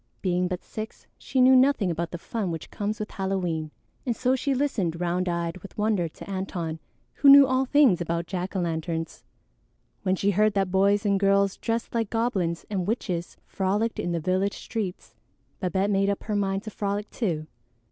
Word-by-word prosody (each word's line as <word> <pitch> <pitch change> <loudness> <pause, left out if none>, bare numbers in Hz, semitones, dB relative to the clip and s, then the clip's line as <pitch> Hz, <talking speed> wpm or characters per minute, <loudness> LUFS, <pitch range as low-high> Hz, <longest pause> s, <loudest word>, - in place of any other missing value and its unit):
Being 180 -1 +1
but 180 -1 -4
six, 220 0 -7
she 260 - -2
knew 255 +1 +7
nothing 255 -8 +4
about 170 0 -2
the 175 - -5
fun 205 +2 -3
which 165 -3 -6
comes 210 +1 -3
with 215 - -5
Halloween, 180 -5 -2 0.3
and 240 -3 -1
so 255 +2 +2
she 270 +1 0
listened 205 - -1
round 180 +1 0
eyed 170 0 -2
with 190 +1 -13
wonder 210 -5 +1
to 160 - -12
Antone, 180 -4 -4 0.3
who 280 - +5
knew 280 0 +10
all 260 0 +1
things 260 - +4
about 170 0 -1
jack 185 +2 -4
o' 190 - +1
lanterns. 165 -1 -3 0.8
When 185 - +1
she 200 +2 +1
heard 210 +2 +2
that 195 -2 +1
boys 200 +2 +3
and 200 -1 +2
girls 200 0 +3
dressed 230 0 -2
like 225 -3 0
goblins 195 -8 -1
and 190 -3 -2
witches 180 -6 -2
frolicked 205 +4 -1
in 175 - -1
the 170 - 0
village 185 +4 0
streets, 205 -5 -5 0.5
Babette 190 +2 0
made 195 0 +2
up 200 - -2
her 215 - -2
mind 195 -1 0
to 215 - -7
frolic 205 +1 -2
too. 165 -10 -2
195 Hz, 190 wpm, -26 LUFS, 175-215 Hz, 0.8 s, knew